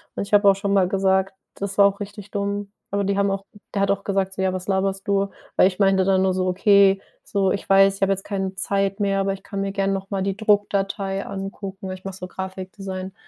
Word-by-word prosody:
Und -, -, -2 dB
ich 205 Hz, -, -10 dB
habe 205 Hz, -1 st, +7 dB
auch 195 Hz, -, +5 dB
schon 200 Hz, 0 st, -1 dB
mal 190 Hz, -2 st, +4 dB
gesagt, 190 Hz, 0 st, +1 dB, 0.2 s
das 195 Hz, -1 st, -5 dB
war 200 Hz, -, +7 dB
auch 200 Hz, 0 st, +1 dB
richtig 205 Hz, 0 st, -8 dB
dumm. 200 Hz, 0 st, -3 dB, 0.2 s
Aber 200 Hz, 0 st, 0 dB
die 200 Hz, 0 st, 0 dB
haben 200 Hz, 0 st, +2 dB
auch 195 Hz, 0 st, -3 dB, 0.3 s
der 200 Hz, -, 0 dB
hat 200 Hz, -, +3 dB
auch 200 Hz, 0 st, -1 dB
gesagt 195 Hz, -1 st, -1 dB
so: 190 Hz, -, -4 dB
„Ja, 190 Hz, 0 st, +2 dB
was 185 Hz, 0 st, -5 dB
laberst 195 Hz, 0 st, -1 dB
du?“ 200 Hz, 0 st, +1 dB, 0.3 s
Weil -, -, +6 dB
ich 185 Hz, 0 st, -4 dB
meinte 195 Hz, -1 st, +4 dB
dann 190 Hz, 0 st, +3 dB
nur 190 Hz, -1 st, +2 dB
so: 185 Hz, 0 st, 0 dB
„Okay“, 195 Hz, +1 st, +4 dB, 0.2 s
so, 195 Hz, -2 st, 0 dB
ich 200 Hz, -, -3 dB
weiß, 195 Hz, 0 st, +6 dB
ich -, -, -13 dB
hab 195 Hz, -, +3 dB
jetzt 195 Hz, 0 st, 0 dB
keine 195 Hz, -2 st, -3 dB
Zeit 195 Hz, +1 st, -1 dB
mehr, 195 Hz, -1 st, +1 dB
aber 195 Hz, 0 st, 0 dB
ich 195 Hz, -, -10 dB
kann 200 Hz, -2 st, -4 dB
mir 195 Hz, 0 st, -2 dB
gern 195 Hz, 0 st, 0 dB
noch 195 Hz, 0 st, -4 dB
mal 195 Hz, -2 st, -1 dB
die 195 Hz, -1 st, -1 dB
Druckdatei 200 Hz, -2 st, 0 dB
angucken. 195 Hz, 0 st, -6 dB
Ich 185 Hz, 0 st, -8 dB
mache 195 Hz, -1 st, -6 dB
so 180 Hz, -, -7 dB
Grafikdesign. 190 Hz, 0 st, -6 dB
195 Hz, 250 wpm, -23 LUFS, 190-200 Hz, 0.3 s, habe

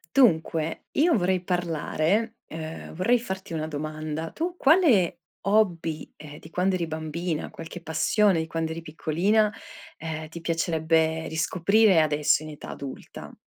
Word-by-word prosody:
Dunque, 165 Hz, -, +3 dB
io 320 Hz, 0 st, +3 dB
vorrei 185 Hz, -1 st, +1 dB
parlare, 175 Hz, +5 st, 0 dB
uhm, 160 Hz, 0 st, -7 dB
vorrei 230 Hz, +9 st, +3 dB
farti 190 Hz, -5 st, -6 dB
una 155 Hz, -1 st, -2 dB
domanda. 155 Hz, +1 st, -4 dB
Tu 345 Hz, -, -3 dB
quale 275 Hz, -, +4 dB, 0.3 s
hobby, 175 Hz, -7 st, +1 dB
ehm, 150 Hz, -1 st, -11 dB
di 160 Hz, -, -14 dB
quando 185 Hz, +2 st, +1 dB
eri 175 Hz, -2 st, -1 dB
bambina, 160 Hz, +1 st, -3 dB
qualche 165 Hz, +2 st, -9 dB
passione 185 Hz, +4 st, +2 dB
di 160 Hz, -, -1 dB
quando 165 Hz, 0 st, -2 dB
eri 160 Hz, +1 st, -5 dB
piccolina, 175 Hz, +7 st, +1 dB, 0.5 s
ehm, 160 Hz, -1 st, -5 dB
ti 170 Hz, -, -8 dB
piacerebbe 160 Hz, -1 st, +1 dB
riscoprire 185 Hz, +4 st, +3 dB
adesso 150 Hz, -1 st, +2 dB
in 155 Hz, -, -8 dB
età 150 Hz, -, -10 dB
adulta? 140 Hz, -2 st, -8 dB
165 Hz, 140 wpm, -26 LUFS, 160-195 Hz, 0.5 s, quale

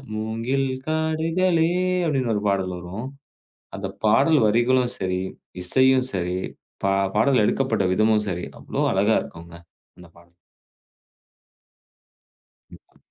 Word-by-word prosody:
"மூங்கில் 115 Hz, +5 st, -1 dB, 0.2 s
காடுகளே" 160 Hz, +2 st, +1 dB, 0.4 s
அப்டின்னு 130 Hz, -6 st, 0 dB
1 105 Hz, -, -2 dB
பாடல் 95 Hz, -2 st, -1 dB
வரும். 95 Hz, +8 st, -7 dB, 0.7 s
அந்தப் 95 Hz, 0 st, -7 dB
பாடல் 140 Hz, +8 st, +4 dB
வரிகளும் 120 Hz, +3 st, +2 dB
சரி, 90 Hz, -1 st, -1 dB, 0.4 s
இசையும் 130 Hz, +5 st, +3 dB
சரி, 90 Hz, 0 st, -2 dB, 0.5 s
பா 95 Hz, -, +2 dB, 0.2 s
பாடல் 125 Hz, +1 st, +3 dB
எடுக்கப்பட்ட 115 Hz, -3 st, +1 dB
விதமும் 110 Hz, +1 st, +2 dB
சரி 90 Hz, 0 st, -4 dB
அவ்வளோ -, -, -4 dB
அழகா -, -, +3 dB
இருக்கும்ங்க 85 Hz, 0 st, -11 dB, 0.4 s
அந்தப் 85 Hz, -2 st, -16 dB
பாடல். 85 Hz, 0 st, -21 dB, 2.4 s
கண்டிப்பா. -, -, -18 dB
110 Hz, 105 wpm, -23 LUFS, 95-135 Hz, 2.4 s, பாடல்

